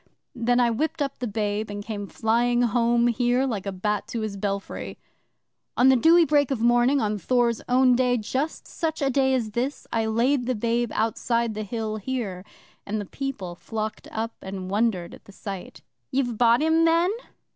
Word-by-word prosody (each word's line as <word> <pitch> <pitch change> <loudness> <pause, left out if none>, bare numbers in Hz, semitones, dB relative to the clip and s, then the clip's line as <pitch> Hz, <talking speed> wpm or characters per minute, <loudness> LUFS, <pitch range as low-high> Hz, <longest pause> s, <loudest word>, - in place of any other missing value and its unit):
Then 245 -1 +1
I 240 -1 +3
whipped 315 +7 -1
up 280 -2 -2
the 245 - -2
babe, 210 0 -2
and 205 0 -6
came 205 -3 -5
flying 240 +3 +1
home 235 0 +2
here 245 +2 +2
like 210 -7 -3
a - - -1
bat 210 +2 -2
to 230 0 -4
his 215 -2 -3
belfry. 200 0 -4 0.8
'On 255 +2 +6
the 265 - +6
dewy 330 +6 +6
break 290 -2 +3
of 270 -4 -1
morning 240 +4 +3
of 210 -3 -1
Thor's 240 -1 +1
own 255 0 +5
day 250 0 +2
just 260 +8 -3
such 320 -1 -3
a 270 - +2
day 265 0 +2
as 225 -4 -2
this 250 +6 -3
I 225 -1 +1
laid 245 +3 +1
the 255 - 0
babe 235 +2 0
outside 230 +1 0
the 215 - -4
Hill 215 0 -3
here, 210 -5 -4 0.4
and 215 +1 -3
the 205 - -4
People 205 -7 -5
flocked 215 +4 -5
up 225 +1 -3
and 190 -1 -6
wondered 200 -5 0
at - - -14
the - - -14
sight. 190 -6 -8 0.3
'"You've 250 -3 0
brought 235 +4 +4
him, 320 +1 +3
then?" 335 +3 +3
235 Hz, 190 wpm, -25 LUFS, 210-255 Hz, 0.8 s, On